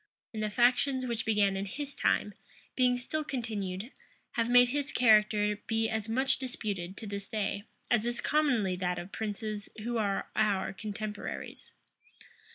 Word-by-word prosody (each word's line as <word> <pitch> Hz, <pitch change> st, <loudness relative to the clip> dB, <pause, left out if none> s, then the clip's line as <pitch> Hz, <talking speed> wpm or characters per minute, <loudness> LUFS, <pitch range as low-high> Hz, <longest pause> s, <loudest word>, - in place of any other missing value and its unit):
And 215 Hz, -, -3 dB
the 215 Hz, -, 0 dB
factions 255 Hz, +3 st, +3 dB
which 235 Hz, -3 st, -2 dB
began 205 Hz, -3 st, +3 dB
in 195 Hz, +1 st, -2 dB
his 285 Hz, +6 st, -5 dB
time, 210 Hz, -, +1 dB, 0.4 s
being 250 Hz, -1 st, +4 dB
still 310 Hz, +5 st, -3 dB
continued, 220 Hz, -5 st, -3 dB, 0.4 s
have 230 Hz, 0 st, 0 dB
made 245 Hz, 0 st, +7 dB
his 285 Hz, +2 st, -1 dB
character 210 Hz, -3 st, +4 dB
be 225 Hz, 0 st, +1 dB
as 220 Hz, 0 st, -2 dB
much 260 Hz, +4 st, +2 dB
disputed 200 Hz, -8 st, -4 dB
to -, -, -7 dB
this 200 Hz, -1 st, -5 dB
day, 205 Hz, -1 st, -2 dB, 0.3 s
as 235 Hz, -1 st, +3 dB
is 240 Hz, 0 st, -1 dB
commonly 250 Hz, -11 st, +2 dB
that 180 Hz, -1 st, -1 dB
of 175 Hz, +2 st, -6 dB
princes 215 Hz, 0 st, -4 dB
who 235 Hz, 0 st, -1 dB
are 200 Hz, -2 st, 0 dB
our 205 Hz, -3 st, +1 dB
contemporaries. 210 Hz, +1 st, -6 dB
220 Hz, 155 wpm, -31 LUFS, 205-245 Hz, 0.4 s, made